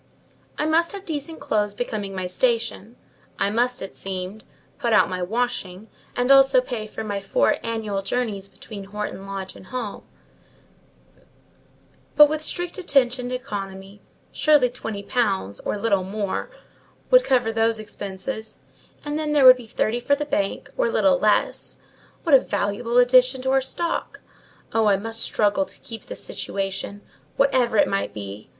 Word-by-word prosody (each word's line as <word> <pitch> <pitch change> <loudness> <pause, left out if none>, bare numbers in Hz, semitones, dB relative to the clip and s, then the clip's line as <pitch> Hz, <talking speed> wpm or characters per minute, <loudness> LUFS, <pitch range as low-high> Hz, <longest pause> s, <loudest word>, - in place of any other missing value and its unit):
I 300 - 0
must 330 +3 +2
have 395 -1 -8
decent 315 0 -4
clothes 210 -1 -1
becoming 205 -4 -4
my 185 -1 -3
station; 230 +2 -1 0.4
I 200 - +1
must, 245 +2 0
it 195 - -7
seemed, 190 +2 -6 0.3
put 235 -1 0
out 190 - +4
my 185 0 -3
washing, 215 -1 -2 0.3
and 245 +2 +2
also 270 -1 +7
pay 240 -4 -4
for 220 - -6
my 205 -2 -3
four 195 - +2
annual 220 -3 -2
journeys 200 -2 -2
between 200 -3 -10
Horton 200 -1 -6
Lodge 195 -1 -6
and 185 - -13
home; 240 -4 -5 2.1
but 295 +1 +9
with 310 +1 -2
strict 350 +3 -4
attention 255 -7 +1
to 255 - -2
economy, 195 -3 -7 0.3
surely 295 -5 +4
twenty 210 -4 -6
pounds, 195 - -1
or - - -3
little 200 -3 +1
more, 200 +1 -3 0.6
would - - +7
cover 245 - +2
those 225 0 +2
expenses, 215 +2 -6 0.5
and 295 +1 -2
then 305 -1 -1
there 285 -3 +5
would 255 0 +10
be 240 -3 -11
thirty 220 +2 0
for 285 +4 +2
the 295 +1 -3
bank, 200 -9 -1
or - - +2
little - - +3
less: - - +1 0.5
what 325 - +1
a 270 - +10
valuable 210 +4 -1
addition 255 +1 +5
to 265 - +1
our 270 0 +4
stock! 335 +6 -3 0.5
Oh, 225 -1 +3
I 200 -1 +4
must 225 +3 -4
struggle 210 +7 +1
to - - -12
keep 225 -3 -9
this - - -5
situation, 195 +1 -4 0.4
whatever 255 -5 +3
it - - +5
might 195 0 -2
be! 100 0 -8
225 Hz, 160 wpm, -23 LUFS, 200-260 Hz, 2.1 s, would